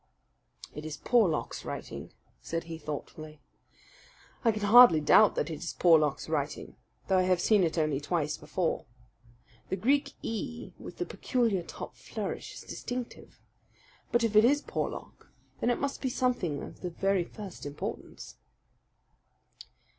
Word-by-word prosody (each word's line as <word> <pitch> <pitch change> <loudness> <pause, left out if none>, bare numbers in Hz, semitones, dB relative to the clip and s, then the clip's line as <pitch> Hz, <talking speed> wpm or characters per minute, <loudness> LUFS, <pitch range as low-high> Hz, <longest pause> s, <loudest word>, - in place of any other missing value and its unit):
"It 150 - -7
is 155 -1 -5
Porlock's 215 -10 +1
writing," - - -6 0.3
said 165 0 -3
he 165 -1 -7
thoughtfully. 155 0 -7 1.0
"I 230 - +5
can 210 -1 -4
hardly 220 -5 +9
doubt 195 +7 +6
that - - -1
it 155 - -5
is 170 - -4
Porlock's 155 -5 +3
writing, - - -3 0.3
though 190 -1 +3
I 185 0 +1
have 180 -1 +3
seen 205 +1 +4
it 165 0 0
only 155 -4 +1
twice 150 -1 -1
before. 180 -3 -2 0.8
The - - 0
Greek 275 +8 +1
e 230 +2 -5
with - - -9
the - - -2
peculiar 230 -8 0
top 170 - -8
flourish - - -5
is - - -8
distinctive. 245 -1 -7 0.7
But 240 0 +3
if 220 -2 0
it 215 - +8
is 290 +5 +4
Porlock, - - -5 0.3
then - - +1
it 245 - +1
must 280 0 -3
be 260 - 0
something 245 - -1
of - - -10
the 180 - -3
very 195 +1 +1
first 195 +1 -9
importance." 145 0 -7
185 Hz, 145 wpm, -30 LUFS, 160-235 Hz, 1.0 s, hardly